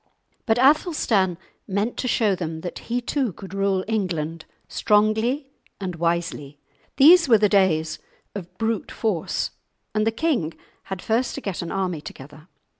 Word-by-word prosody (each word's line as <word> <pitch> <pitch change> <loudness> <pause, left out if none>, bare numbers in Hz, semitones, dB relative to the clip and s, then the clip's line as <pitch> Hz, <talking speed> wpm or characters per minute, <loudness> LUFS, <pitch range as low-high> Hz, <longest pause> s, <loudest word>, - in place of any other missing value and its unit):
But 225 0 +3
Athelstan 250 - +3 0.3
meant 205 +4 -1
to 255 - -2
show 220 -4 +2
them 165 -3 -4
that 175 - -6
he 245 +1 0
too 255 -1 -1
could 190 +1 -10
rule 195 -1 0
England 165 -7 -2 0.2
strongly 220 +7 +1 0.3
and 185 -3 -4
wisely. 165 -4 -2 0.4
These 330 +2 +7
were 225 - +8
the 210 0 +4
days 160 -6 +2 0.3
of 185 -4 -8
brute 225 -2 -1
force, 205 -8 -1 0.4
and 215 0 +1
the - - +3
king 225 - -1 0.3
had 190 -2 -6
first 235 +3 0
to 280 - -5
get 195 -7 -3
an 170 - -5
army 185 -5 -2
together. 150 +2 -11
200 Hz, 150 wpm, -23 LUFS, 170-230 Hz, 0.4 s, were